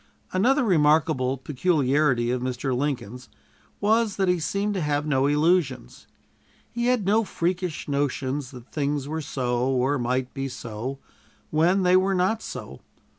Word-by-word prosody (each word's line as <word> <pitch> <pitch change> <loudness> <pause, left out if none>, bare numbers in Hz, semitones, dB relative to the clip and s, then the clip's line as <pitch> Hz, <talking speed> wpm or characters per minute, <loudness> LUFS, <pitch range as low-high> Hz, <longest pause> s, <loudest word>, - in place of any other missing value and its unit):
Another 255 +9 +3
remarkable 150 - +2
peculiarity 135 -3 +1
of 125 0 -1
Mr. 130 +1 -2
Lincoln's 125 -3 -3 0.5
was 220 0 +2
that 190 -1 0
he 180 -1 +2
seemed 200 +6 -1
to 190 - -2
have 145 -1 0
no 135 -2 +2
illusions. 150 - 0 0.6
He 235 0 -1
had 250 -5 +2
no 215 +3 +3
freakish 180 -3 -2
notions 140 -1 -1
that 125 -2 -13
things 145 -2 -1
were 160 +2 -3
so, 125 -3 -1
or 135 +2 +1
might 125 +1 -1
be 135 -1 -3
so, 125 +1 -6 0.5
when 175 +5 +3
they 180 0 +4
were 190 +1 +3
not 190 +5 +1
so. - - -8
145 Hz, 145 wpm, -25 LUFS, 130-185 Hz, 0.6 s, they